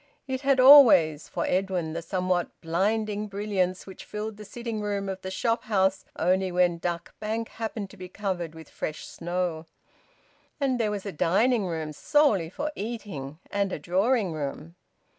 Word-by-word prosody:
It 260 -1 -2
had 275 -2 +3
always, 210 - +8
for - - -2
Edwin, 185 -4 -1
the 170 - -3
somewhat 180 0 -1
blinding 210 +5 0
brilliance 195 -3 -1
which 190 - -10
filled 210 0 -5
the 210 - -9
sitting 230 0 -5
room 200 -1 -2
of 190 -1 -4
the 190 - -5
shop 230 +5 -1
house 190 -3 +1
only 185 +1 +1
when 175 -1 +2
Duck 170 -1 -3
Bank 220 +1 -3
happened 220 -3 -5
to 200 - -14
be 185 -1 -8
covered 180 -5 -3
with 160 -2 -11
fresh 155 - -5
snow. 175 -2 -3 0.9
And 265 -3 +1
there 220 -2 +1
was 205 -1 -4
a 200 - -3
dining 200 +7 +2
room, 160 -3 -4
solely 215 - +2
for 295 - -3
eating, 200 - -6
and 200 -1 0
a - - -2
drawing 190 - +1
room. 155 +2 -5
190 Hz, 165 wpm, -27 LUFS, 175-215 Hz, 0.9 s, always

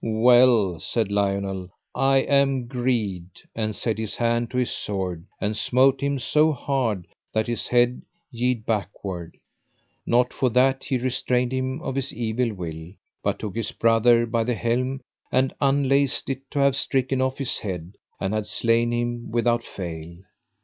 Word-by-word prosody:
Well, 115 -5 +4
said 110 +5 -1
Lionel, 100 -2 -1 0.2
I 135 0 +3
am 135 -2 +2
greed; 120 -8 -1 0.3
and 110 -2 -2
set 110 -2 -1
his 110 -2 -3
hand 120 0 0
to 125 - -4
his 125 -1 +1
sword 90 -4 -3
and 105 +1 -1
smote 130 +4 +3
him 140 0 0
so 150 +4 +3
hard 120 -9 -1 0.3
that 110 0 +1
his 120 -3 -2
head 120 0 +2 0.3
yede 120 -1 -1
backward. 100 -5 -4 0.7
Not 125 +1 +2
for 130 - +1
that 130 +2 +2
he 130 - 0
restrained 125 0 0
him 130 +4 -2
of 135 - -3
his 135 0 -1
evil 115 +1 -1
will, 85 -3 -7 0.3
but - - -1
took 105 -2 -6
his 115 -2 -2
brother 115 +1 +4
by 115 0 0
the 120 +1 -1
helm, 125 +4 -1 0.3
and 130 +1 +2
unlaced 140 0 +2
it 135 0 -7
to 150 - -6
have 140 -1 +3
stricken 130 -1 0
off 130 0 0
his 135 -3 0
head, 90 -2 -6 0.2
and 95 +2 -2
had 110 -1 -2
slain 115 0 +2
him 120 0 -2
without 120 0 +1
fail. 85 -4 -7
120 Hz, 160 wpm, -24 LUFS, 105-130 Hz, 0.7 s, Well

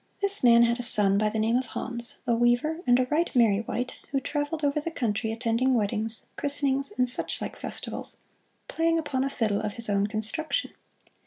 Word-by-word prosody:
This 400 -4 +7
man 235 -1 +6
had 235 +1 +1
a - - -2
son 205 -4 +3
by 215 0 +1
the 220 - -4
name 225 +2 +1
of 255 -1 -3
Hans, 235 0 -1
a 240 - +1
weaver 240 +7 +1
and 245 0 +5
a 255 - +1
right 330 +3 +1
merry 220 -4 +3
wight, 245 +2 -4 0.2
who 275 - -1
traveled 295 +3 -4
over 285 +1 +1
the 335 - -4
country 220 -7 -2
attending 230 +3 0
weddings, 220 +1 0
christenings 280 -1 0
and 250 0 +2
such 245 - 0
like - - -6
festivals, - - -2 0.5
playing 330 0 0
upon 290 -5 -2
a 275 - -1
fiddle 220 -6 -1
of 210 -1 -4
his 225 -1 0
own 200 0 +1
construction. 225 - -2
245 Hz, 195 wpm, -26 LUFS, 220-280 Hz, 0.5 s, This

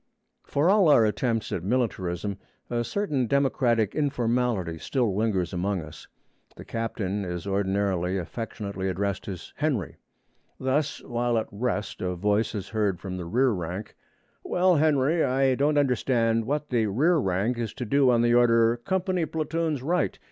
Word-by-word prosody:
For 145 +4 +1
all 195 -2 +5
our 120 -6 +6
attempts 115 +1 -1
at 85 - -3
militarism, 100 -4 -1 0.3
a 120 0 0
certain 145 - -1
democratic 120 -5 +2
informality 120 - 0
still 120 - 0
lingers 100 -4 0
among 95 0 -1
us. 75 0 -12 0.5
The - - -11
captain 105 -3 -3
is 90 -1 -5
ordinarily 95 -2 0
affectionately 100 0 -4
addressed 100 +1 -2
as 95 -4 -7
'Henry.' 135 - -1 0.6
Thus, 140 +3 -1
while 120 -1 0
at 110 - 0
rest, 105 -1 -3
a 90 -1 -1
voice 105 +5 0
is 100 -2 -5
heard 105 -5 0
from 95 -2 -6
the 90 - -5
rear 125 +9 +2
rank: 90 +1 -5 0.5
'Well, 180 -1 +3
Henry, 155 +1 +3
I 130 +1 +2
don't 145 +3 +1
understand 120 -4 +2
what 150 +3 -2
the 115 -3 +2
rear 150 - +3
rank 110 0 0
is 115 -3 -2
to 125 - -4
do 135 +3 +3
on 120 -1 +3
the 120 0 +3
order, 115 -1 +4
"Company 185 - -1
platoons 160 -3 -2
right." 175 +5 0
115 Hz, 155 wpm, -26 LUFS, 100-135 Hz, 0.6 s, our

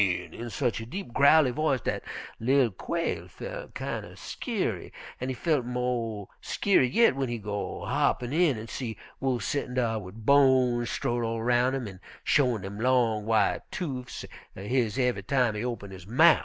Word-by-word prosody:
in 90 +4 -1
sech 120 -3 -1
a 115 - -6
deep, 170 -4 -6
growly 140 -1 +6
voice 140 -2 +1
dat - - -2 0.4
li'l 130 0 +3
Quail 165 - -3
felt - - -8
kind - - -3
er - - -11
skeery, 195 - -3 0.3
an' 130 - -3
he 130 - -2
feel 150 +3 +1
mo' 120 -4 -2
skeery 190 -11 +2
yit 230 - +5
w'en 135 -1 -2
he 120 - -2
go 105 -1 -4
hoppin' 140 -2 +1
in 160 -6 +3
an' 110 +1 -7
see 115 -1 -5 0.2
Wolf 130 -3 0
settin' 140 -3 -2
dar 115 -3 +1
wid 105 +3 -10
bones 130 -4 +4
strowed 120 -3 -1
all 115 0 -2
roun' 125 +2 +3
him, 130 -4 -3
an' 95 -2 -9 0.2
showin' 125 -8 +2
dem 100 +2 -6
long, 115 -3 +2
white 110 -3 +2
toofs 130 -8 -5 0.3
er - - -7
his 120 0 0
ev'y 125 -5 +1
time 125 +2 +2
he 105 +2 -3
open 115 -5 -4
his 95 -1 -10
mouf. 155 +9 +6
125 Hz, 180 wpm, -28 LUFS, 110-135 Hz, 0.4 s, growly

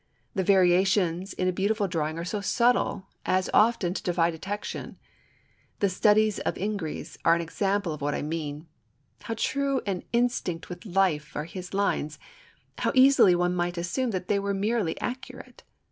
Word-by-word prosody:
The 190 - 0
variations 185 0 +3
in 185 - -1
a - - +3
beautiful 200 +3 0
drawing 160 -3 -2
are 170 - -4
so 205 +3 -3
subtle 235 -2 +1 0.2
as 185 0 0
often 210 -5 +3
to - - -4
defy 170 -2 +1
detection. 195 +6 -6 0.8
The 200 - +2
studies 210 +2 +3
of - - -2
Ingres 200 -5 -4
are 165 - +5
an 170 - -1
instance 195 +4 -1
of 155 -3 -4
what 145 +1 -1
I - - -3
mean. 150 0 -4 0.6
How 225 - -4
true 275 +2 0
and 195 -3 -2
instinct 235 -8 -1
with 180 +4 -8
life 175 -5 +1
are 150 - -2
his 180 +2 -8
lines, 155 -7 0 0.6
and - - -3
how - - +3
easily 260 -8 +6
one 175 0 +1
might 175 0 -1
assume 180 +10 -1
that 185 -4 -3
they 200 - +2
were 200 0 -1
merely 205 -3 0
accurate. 255 0 -7
190 Hz, 170 wpm, -27 LUFS, 170-210 Hz, 0.8 s, easily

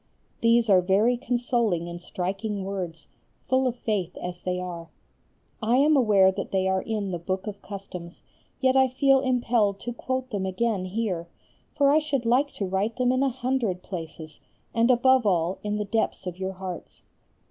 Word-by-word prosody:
These 230 0 +4
are 190 -3 +6
very 200 +7 +3
consoling 235 -8 0
and 175 0 -7
striking 195 +3 -3
words, 180 -5 -5 0.4
full 260 0 +2
of 245 - -1
faith 205 -7 -2
as 175 0 -6
they 180 0 -2
are. 175 -2 -6 0.7
I 225 +2 +2
am 300 +3 +5
aware 205 -7 +5
that - - -5
they 190 -1 +1
are 190 0 +1
in 210 -3 -3
the 175 - -3
Book 185 +2 -3
of 205 -2 -6
Customs, 185 -4 -8 0.4
yet 260 -1 +3
I 265 0 +5
feel 270 +1 +3
impelled 240 -6 +1
to 240 - -4
quote 260 +1 -3
them 195 -3 -2
again 195 0 -1
here, 185 -4 -2 0.5
for 280 -1 +4
I 305 - +5
should 285 -5 -2
like 260 +5 +3
to 200 - -3
write 195 +4 -1
them 250 0 +2
in 255 +1 +1
a 275 - +3
hundred 245 -7 -1
places, 160 -4 -8 0.3
and 230 +2 +3
above 255 -1 +4
all 175 -1 +1
in 210 0 -2
the 210 - -2
depths 220 -1 -1
of 180 0 -6
your 190 0 -3
hearts. 185 -2 -8
210 Hz, 180 wpm, -26 LUFS, 185-245 Hz, 0.7 s, are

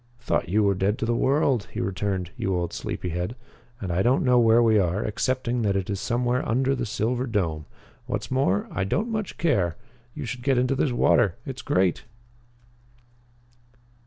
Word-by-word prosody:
"Thought 105 -8 -1
you 105 +3 +3
were 100 -1 +3
dead 100 +3 0
to - - -2
the 120 - +1
world," 135 -3 +2
he - - -4
returned, 95 -2 -2
"you 95 -1 -1
old 85 -1 -2
sleepy 90 - -4
head. 90 +7 -3 0.4
And 95 -3 -4
I 85 +2 +1
don't 125 +6 +3
know 125 -1 +5
where 115 0 +5
we 110 -2 +4
are, 95 +2 0
excepting 125 +3 -1
that 100 -3 +1
it 95 +1 -1
is 100 - -2
somewhere 120 +2 0
under 130 +4 +2
the 125 -3 -2
silver 120 +4 -1
dome. 85 -9 -1 0.4
What's - - -3
more, 130 -7 +1
I 100 - -1
don't 200 - -1
much 215 -3 -3
care. 100 - +1 0.4
You - - -5
should 125 +1 -5
get 135 0 +2
into 125 +2 +2
this 135 0 +1
water. 100 -6 +3
It's 130 -1 -6
great!" 90 -1 +1
115 Hz, 185 wpm, -25 LUFS, 95-125 Hz, 0.4 s, know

